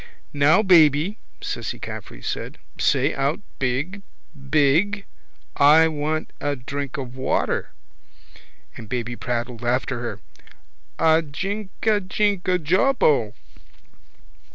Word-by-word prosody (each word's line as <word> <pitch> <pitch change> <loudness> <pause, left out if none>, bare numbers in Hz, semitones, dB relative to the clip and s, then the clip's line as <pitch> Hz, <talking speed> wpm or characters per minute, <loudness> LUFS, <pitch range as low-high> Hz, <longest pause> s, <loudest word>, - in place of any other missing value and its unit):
—Now, 145 +8 +4
baby, 165 +1 +4 0.2
Cissy - - -4
Caffrey - - -8
said. - - -4 0.2
Say 140 +1 +2
out 140 +3 0 0.2
big, 140 +10 -2 0.5
big. 165 +8 +2 0.5
I 155 +3 +6
want 155 +1 -3
a 145 0 -1
drink 140 +3 -5
of 130 -2 -6
water. 130 0 -1 1.1
And 110 -3 -10
baby 120 0 -3
prattled 120 0 -4
after 125 +1 0
her: 120 - -5 0.8
—A 160 0 +4
jink 190 +7 -4
a 215 -2 +3
jink 200 0 0
a 180 0 +3
jawbo. 160 - +2
150 Hz, 105 wpm, -23 LUFS, 130-185 Hz, 1.1 s, I